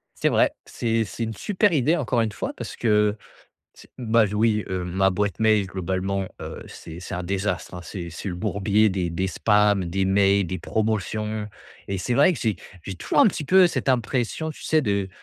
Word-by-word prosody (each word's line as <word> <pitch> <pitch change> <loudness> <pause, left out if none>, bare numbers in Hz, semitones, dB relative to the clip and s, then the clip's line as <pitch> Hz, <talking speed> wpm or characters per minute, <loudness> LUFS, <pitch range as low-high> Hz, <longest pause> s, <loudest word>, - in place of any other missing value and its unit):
C'est - - +1
vrai. - - +3
C'est 115 -1 -1
c'est 115 - -5
une 110 0 -3
super 205 - +1
idée, 150 +2 +3
encore 125 -6 0
une 110 -1 0
fois, 100 - -4
parce - - -6
que, 105 -2 +2 0.6
ts - - -16
bah, 115 -2 +3
oui, 105 -1 +2
heu, 95 -1 -2
ma 95 +2 +2
boîte 100 -1 -1
mail, 110 -3 +3
globalement, 95 +1 -2
heu, - - -7
c'est 80 +1 -10
c'est 90 - -6
un 90 - -3
désastre, 100 +2 -2
hein. 90 - -6
C'est 85 -1 -6
c'est 85 +5 -6
le 90 - -3
bourbier 105 +2 +2
des 95 -3 -1
des 95 +3 -1
spams, 105 -1 +3
des 95 +3 -1
mails, 100 0 +3
des 95 +2 -4
promotions 110 0 -2 0.4
et 100 - -2
c'est 120 +7 -1
vrai 145 +8 +5
que 155 - -5
j'ai 110 -5 0 0.3
j'ai 95 - -6
toujours 90 - +1
un - - +7
petit 155 - -4
peu 185 +4 +6
cette 165 - -3
impression, 125 +5 0
tu - - -11
sais, 155 -1 +2
de 100 -5 0
105 Hz, 205 wpm, -24 LUFS, 95-115 Hz, 0.6 s, un